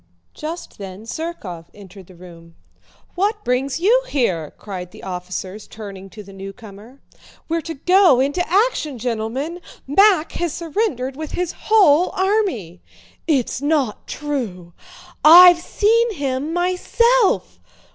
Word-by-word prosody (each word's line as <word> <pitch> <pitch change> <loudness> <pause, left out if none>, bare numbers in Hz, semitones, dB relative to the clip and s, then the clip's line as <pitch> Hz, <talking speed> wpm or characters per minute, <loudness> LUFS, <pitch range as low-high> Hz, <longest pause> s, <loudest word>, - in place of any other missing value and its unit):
Just 320 -3 -7
then 195 +1 -8
Zherkóv 225 - -6
entered 195 -2 -14
the 185 - -16
room. 170 -2 -15 0.6
"What 420 +4 -1
brings 255 +2 -1
you 455 +8 +4
here?" 180 - -1
cried 185 -4 -7
the - - -15
officers 185 +2 -6
turning 195 -3 -10
to 210 +2 -11
the 195 0 -14
newcomer. 205 +5 -11 0.5
"We're 330 +1 -1
to 325 +1 -7
go 360 -2 +4
into 285 +7 0
action, 380 - +1
gentlemen! 245 +8 -3 0.2
Mack 365 +3 +4
has 345 -3 -3
surrendered 320 - -2
with 310 +1 -7
his 360 -1 -2
whole 365 -6 +3
army." 375 - -1 0.5
"It's 270 -4 0
not 285 -6 -1
true!" 225 - -5 0.5
"I've 350 +2 +9
seen 450 +5 +1
him 275 0 -3
myself!" 380 +7 +1
280 Hz, 125 wpm, -20 LUFS, -, 0.6 s, I've